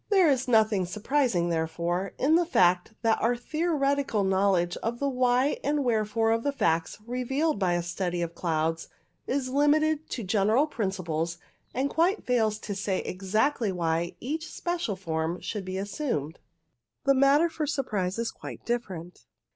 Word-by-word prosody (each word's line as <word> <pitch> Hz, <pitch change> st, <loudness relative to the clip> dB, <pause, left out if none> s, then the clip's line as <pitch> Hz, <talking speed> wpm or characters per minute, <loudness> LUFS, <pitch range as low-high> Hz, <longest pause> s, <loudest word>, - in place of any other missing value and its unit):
There 375 Hz, -7 st, +5 dB
is 260 Hz, -1 st, 0 dB
nothing 215 Hz, -5 st, +3 dB
surprising, 210 Hz, -3 st, 0 dB
therefore, 170 Hz, +3 st, -1 dB
in 285 Hz, +4 st, +2 dB
the 345 Hz, +2 st, +5 dB
fact 185 Hz, -, +2 dB
that 225 Hz, -1 st, +2 dB
our 240 Hz, +2 st, +2 dB
theoretical 280 Hz, -, 0 dB
knowledge 190 Hz, -2 st, +2 dB
of 230 Hz, +1 st, -3 dB
the 280 Hz, -, -1 dB
why 255 Hz, +1 st, +2 dB
and 290 Hz, 0 st, +1 dB
wherefore 225 Hz, -1 st, +1 dB
of 225 Hz, 0 st, +1 dB
the 285 Hz, -, 0 dB
facts 165 Hz, -10 st, 0 dB
revealed 255 Hz, +4 st, -1 dB
by 185 Hz, -3 st, +2 dB
a 175 Hz, 0 st, 0 dB
study 175 Hz, 0 st, -2 dB
of 170 Hz, 0 st, -4 dB
clouds 165 Hz, -1 st, -1 dB, 0.4 s
is 260 Hz, -1 st, -1 dB
limited 300 Hz, +2 st, +2 dB
to 235 Hz, -, -4 dB
general 215 Hz, +7 st, +3 dB
principles, 180 Hz, -, -2 dB, 0.4 s
and 265 Hz, +3 st, +1 dB
quite 345 Hz, +8 st, +1 dB
fails 220 Hz, -4 st, +2 dB
to 205 Hz, -, -4 dB
say 195 Hz, -1 st, -1 dB
exactly 215 Hz, +5 st, 0 dB
why 170 Hz, -1 st, -1 dB
each 315 Hz, +6 st, -4 dB
special 345 Hz, -, -2 dB
form 165 Hz, -1 st, -2 dB
should 205 Hz, -3 st, -5 dB
be 185 Hz, 0 st, -4 dB
assumed. 195 Hz, -, -3 dB, 0.6 s
The 275 Hz, -, +4 dB
matter 275 Hz, +4 st, +5 dB
iot 320 Hz, -3 st, -3 dB
surprise 205 Hz, -10 st, -1 dB
is 230 Hz, 0 st, -1 dB
quite -, -, -10 dB
different. 185 Hz, -8 st, -4 dB
220 Hz, 155 wpm, -27 LUFS, 180-275 Hz, 0.6 s, There